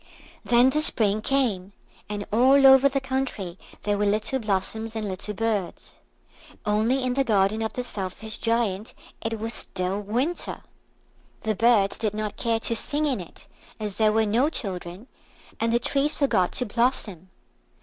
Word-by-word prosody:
Then 245 Hz, +2 st, +4 dB
the 305 Hz, -, +1 dB
Spring 215 Hz, -7 st, +3 dB
came, 215 Hz, -8 st, 0 dB, 0.4 s
and 205 Hz, -1 st, -4 dB
all 265 Hz, +4 st, +5 dB
over 265 Hz, +1 st, +8 dB
the 275 Hz, 0 st, 0 dB
country 260 Hz, -9 st, -3 dB, 0.2 s
there 205 Hz, -1 st, 0 dB
were 210 Hz, -, +2 dB
little 215 Hz, +6 st, 0 dB
blossoms 220 Hz, +1 st, -2 dB
and 215 Hz, -1 st, -3 dB
little 195 Hz, +2 st, -5 dB
birds. 215 Hz, -4 st, -3 dB, 0.7 s
Only 220 Hz, +6 st, +1 dB
in 255 Hz, -1 st, 0 dB
the 275 Hz, +1 st, +2 dB
garden 215 Hz, -2 st, +2 dB
of 220 Hz, -, -2 dB
the 250 Hz, -, -3 dB
Selfish 215 Hz, 0 st, -6 dB
Giant 225 Hz, -2 st, -1 dB, 0.3 s
it 225 Hz, 0 st, -2 dB
was 225 Hz, +2 st, -4 dB
still 185 Hz, +2 st, -3 dB
winter. 250 Hz, -, -2 dB, 0.8 s
The 220 Hz, -, 0 dB
birds 215 Hz, -2 st, +3 dB
did 215 Hz, -2 st, -1 dB
not 215 Hz, -1 st, -3 dB
care 230 Hz, -1 st, 0 dB
to 230 Hz, -, 0 dB
sing 295 Hz, +6 st, -1 dB
in 270 Hz, -7 st, 0 dB
it 175 Hz, -, -10 dB, 0.3 s
as 210 Hz, -3 st, -5 dB
there 215 Hz, -1 st, +4 dB
were 220 Hz, +1 st, +2 dB
no 235 Hz, +8 st, +2 dB
children, 185 Hz, -, -5 dB, 0.5 s
and 230 Hz, 0 st, +1 dB
the 235 Hz, -, +4 dB
trees 280 Hz, +5 st, 0 dB
forgot 215 Hz, -11 st, +2 dB
to 250 Hz, -, 0 dB
blossom. 215 Hz, -6 st, -1 dB
220 Hz, 160 wpm, -25 LUFS, 205-250 Hz, 0.8 s, over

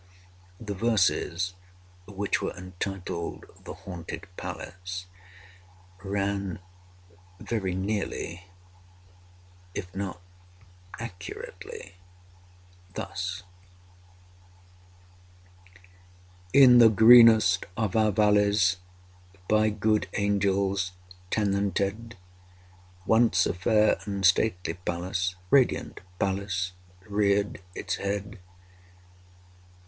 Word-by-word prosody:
The 105 Hz, -3 st, -5 dB
verses, 95 Hz, -4 st, +1 dB, 0.5 s
which 100 Hz, -1 st, -2 dB
were -, -, -4 dB
entitled 90 Hz, -1 st, -5 dB, 0.2 s
"The -, -, -7 dB
Haunted 85 Hz, -3 st, -7 dB
Palace," 90 Hz, +1 st, -7 dB, 1.0 s
ran 100 Hz, -1 st, -2 dB, 0.8 s
very 95 Hz, -6 st, -2 dB
nearly, 95 Hz, -3 st, -3 dB, 1.3 s
if 90 Hz, -2 st, -6 dB
not 95 Hz, -2 st, -4 dB, 0.8 s
accurately, 90 Hz, -4 st, -9 dB, 1.0 s
thus: 90 Hz, +2 st, -4 dB, 2.1 s
I. 90 Hz, 0 st, -26 dB, 0.8 s
In 130 Hz, -3 st, +8 dB
the 115 Hz, -1 st, +8 dB
greenest 110 Hz, -3 st, +7 dB
of 110 Hz, -5 st, -1 dB
our 110 Hz, -1 st, +3 dB
valleys, 105 Hz, -2 st, +3 dB, 0.7 s
By 110 Hz, 0 st, +3 dB
good 105 Hz, 0 st, 0 dB
angels 100 Hz, -2 st, 0 dB, 0.4 s
tenanted, 100 Hz, +2 st, -1 dB, 0.9 s
Once 110 Hz, -5 st, +4 dB
a -, -, 0 dB
fair 105 Hz, +4 st, +2 dB
and 100 Hz, -2 st, -2 dB
stately 90 Hz, -2 st, +2 dB
palace— 90 Hz, +1 st, -3 dB, 0.2 s
Radiant 135 Hz, -3 st, +2 dB, 0.2 s
palace—reared 95 Hz, +1 st, -1 dB
its -, -, -3 dB
head. 100 Hz, +1 st, -4 dB
100 Hz, 70 wpm, -27 LUFS, 90-105 Hz, 2.1 s, In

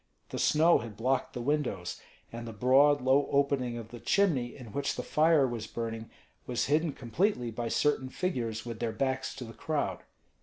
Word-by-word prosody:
The -, -, -4 dB
snow 160 Hz, +3 st, +5 dB
had 110 Hz, -4 st, -8 dB
blocked 130 Hz, +3 st, 0 dB
the 120 Hz, -, -4 dB
windows; 125 Hz, -11 st, -1 dB, 0.3 s
and 115 Hz, 0 st, -6 dB
the 115 Hz, -, -6 dB
broad, 135 Hz, +5 st, +4 dB
low 130 Hz, +3 st, +3 dB
opening 140 Hz, -4 st, +1 dB
of 115 Hz, -1 st, -8 dB
the 120 Hz, -, -9 dB
chimney 150 Hz, -, +1 dB
in 120 Hz, -5 st, -10 dB
which 140 Hz, +6 st, -1 dB
the -, -, -4 dB
fire 155 Hz, -3 st, +4 dB
was 120 Hz, -3 st, -4 dB
burning 115 Hz, -1 st, -5 dB, 0.4 s
was 125 Hz, -1 st, 0 dB
hidden 155 Hz, +2 st, +1 dB
completely 125 Hz, -, -1 dB
by 115 Hz, +1 st, -3 dB
certain 135 Hz, +1 st, +1 dB
figures 120 Hz, -, -2 dB
with 115 Hz, -2 st, -6 dB
their 115 Hz, -2 st, -2 dB
backs 130 Hz, -1 st, -1 dB
to 135 Hz, -, -6 dB
the 115 Hz, -1 st, -9 dB
crowd. 155 Hz, +3 st, -2 dB
130 Hz, 185 wpm, -30 LUFS, 115-145 Hz, 0.4 s, snow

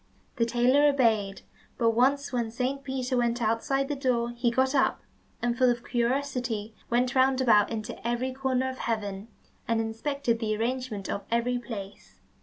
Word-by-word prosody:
The 230 Hz, -1 st, +2 dB
tailor 250 Hz, +5 st, +4 dB
obeyed, 220 Hz, -8 st, +1 dB, 0.3 s
but 230 Hz, -1 st, +3 dB
once 270 Hz, +4 st, +2 dB
when 235 Hz, -2 st, 0 dB
Saint 260 Hz, +4 st, -2 dB
Peter 260 Hz, -1 st, -2 dB
went 240 Hz, 0 st, +1 dB
outside 235 Hz, +5 st, 0 dB
the 290 Hz, -, -2 dB
door, 245 Hz, -3 st, 0 dB
he 240 Hz, 0 st, 0 dB
got 260 Hz, +3 st, +1 dB
up, 270 Hz, -, +2 dB, 0.4 s
and 240 Hz, 0 st, +1 dB
full 255 Hz, 0 st, +4 dB
of 240 Hz, 0 st, -1 dB
curiosity, 245 Hz, -3 st, -1 dB, 0.2 s
went 245 Hz, +2 st, +1 dB
round 260 Hz, 0 st, +3 dB
about 215 Hz, -5 st, +4 dB
into 220 Hz, -1 st, -4 dB
every 245 Hz, +2 st, -1 dB
corner 260 Hz, -1 st, 0 dB
of 260 Hz, 0 st, -5 dB
heaven, 205 Hz, -3 st, -3 dB, 0.4 s
and 230 Hz, -1 st, +1 dB
inspected 230 Hz, +2 st, -1 dB
the 215 Hz, -2 st, -1 dB
arrangement 230 Hz, -3 st, -2 dB
of 200 Hz, -, -3 dB
every 240 Hz, +1 st, +1 dB
place. 205 Hz, -5 st, -9 dB
240 Hz, 165 wpm, -27 LUFS, 230-260 Hz, 0.4 s, tailor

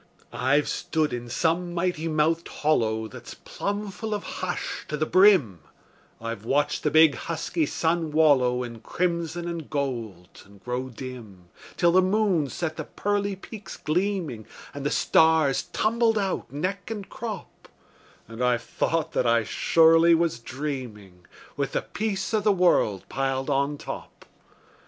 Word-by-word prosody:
I've 130 Hz, +5 st, +2 dB
stood 155 Hz, -3 st, -1 dB
in 120 Hz, 0 st, -5 dB
some 175 Hz, +6 st, 0 dB
mighty 170 Hz, -2 st, -1 dB
mouthed 160 Hz, +2 st, +1 dB
hollow 110 Hz, -7 st, 0 dB
That's 105 Hz, -, -10 dB
plumb 205 Hz, 0 st, -4 dB
full 220 Hz, +2 st, -4 dB
of 205 Hz, -, -5 dB
hush 185 Hz, -1 st, -4 dB
to 150 Hz, -, -3 dB
the 155 Hz, -, 0 dB
brim; 180 Hz, -, +5 dB, 0.6 s
I've 115 Hz, -2 st, -5 dB
watched 145 Hz, +5 st, +1 dB
the 150 Hz, -, +1 dB
big, 155 Hz, -1 st, +6 dB
husky 165 Hz, 0 st, -2 dB
sun 165 Hz, +1 st, 0 dB
wallow 135 Hz, -5 st, +3 dB
In 115 Hz, -2 st, -8 dB
crimson 170 Hz, +4 st, -2 dB
and 170 Hz, -3 st, -5 dB
gold, 115 Hz, -, -4 dB
and 100 Hz, 0 st, -18 dB
grow 125 Hz, +1 st, -3 dB
dim, 115 Hz, -8 st, -10 dB, 0.3 s
Till 175 Hz, -2 st, +4 dB
the 185 Hz, +2 st, +5 dB
moon 185 Hz, -6 st, +1 dB
set 160 Hz, +1 st, -4 dB
the -, -, -3 dB
pearly 205 Hz, -1 st, -1 dB
peaks 210 Hz, +2 st, -10 dB
gleaming, 170 Hz, -, -2 dB, 0.3 s
And 145 Hz, -1 st, -6 dB
the 145 Hz, -, +1 dB
stars 160 Hz, -4 st, +3 dB
tumbled 225 Hz, 0 st, +2 dB
out, 195 Hz, -2 st, -2 dB
neck 185 Hz, +7 st, -3 dB
and 210 Hz, -3 st, -5 dB
crop; 220 Hz, -5 st, -7 dB, 0.6 s
And 115 Hz, +2 st, -5 dB
I've 125 Hz, -1 st, +2 dB
thought 165 Hz, -1 st, -1 dB
that 125 Hz, -, +1 dB
I 115 Hz, -1 st, +3 dB
surely 165 Hz, +8 st, +5 dB
was 165 Hz, -7 st, 0 dB
dreaming, 115 Hz, -9 st, -6 dB, 0.3 s
With 140 Hz, -2 st, -2 dB
the -, -, 0 dB
peace 215 Hz, 0 st, -3 dB
o' 215 Hz, -, +4 dB
the 210 Hz, 0 st, +3 dB
world 175 Hz, -, +2 dB
piled 135 Hz, +1 st, -1 dB
on 140 Hz, +1 st, +1 dB
top. -, -, -8 dB
155 Hz, 150 wpm, -25 LUFS, 125-180 Hz, 0.6 s, big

